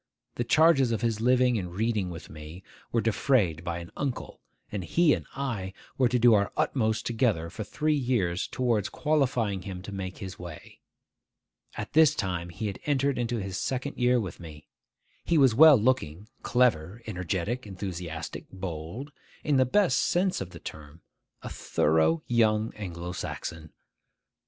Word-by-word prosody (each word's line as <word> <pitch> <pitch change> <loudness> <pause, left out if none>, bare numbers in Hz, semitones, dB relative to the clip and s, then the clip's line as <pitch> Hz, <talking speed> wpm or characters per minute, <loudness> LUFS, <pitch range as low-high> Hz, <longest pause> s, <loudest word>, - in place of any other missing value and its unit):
The 120 - -2
charges 140 -2 +4
of 115 - -1
his 115 -2 0
living 125 -1 +3
and 90 -2 -6
reading 110 -3 0
with 85 -2 -8
me 75 +4 -10 0.3
were 115 - +2
defrayed 105 - +1
by 85 -1 -3
an 85 0 -8
uncle; 140 -4 -4 0.3
and 105 -3 -3
he 165 - +3
and - - -4
I 115 -9 -3 0.2
were 130 -2 +3
to 125 - +2
do 120 -1 +6
our 100 -1 +2
utmost 110 -4 0
together 110 -9 0
for 110 - -5
three 150 +9 0
years 120 -11 0
towards 115 -5 0
qualifying 125 - 0
him 90 -1 -7
to 100 - -7
make 95 -2 -5
his 95 -2 -8
way. 85 -3 -10 1.0
At - - -6
this 160 -2 +6
time 90 -2 -2
he 90 +5 -5
had 100 -3 -4
entered 140 -2 +1
into 120 0 -1
his 95 -3 -4
second 130 +2 -3
year 125 0 +3
with 95 -5 -5
me. 75 -3 -11 0.6
He 170 - +2
was 135 -5 +5
well 150 +3 +8
looking, 105 -6 0
clever, 115 -4 +1
energetic, 100 +4 -3
enthusiastic; 90 -4 -6
bold; 95 - -6 0.3
in 145 -3 +2
the 130 - +5
best 160 -3 +3
sense 180 - +1
of 95 - -5
the - - -11
term, 75 +2 -10 0.4
a - - -5
thorough 80 +1 +1
young 110 -2 +2
Anglo 90 -4 -6
Saxon. 80 -3 -6
110 Hz, 160 wpm, -28 LUFS, 90-125 Hz, 1.0 s, well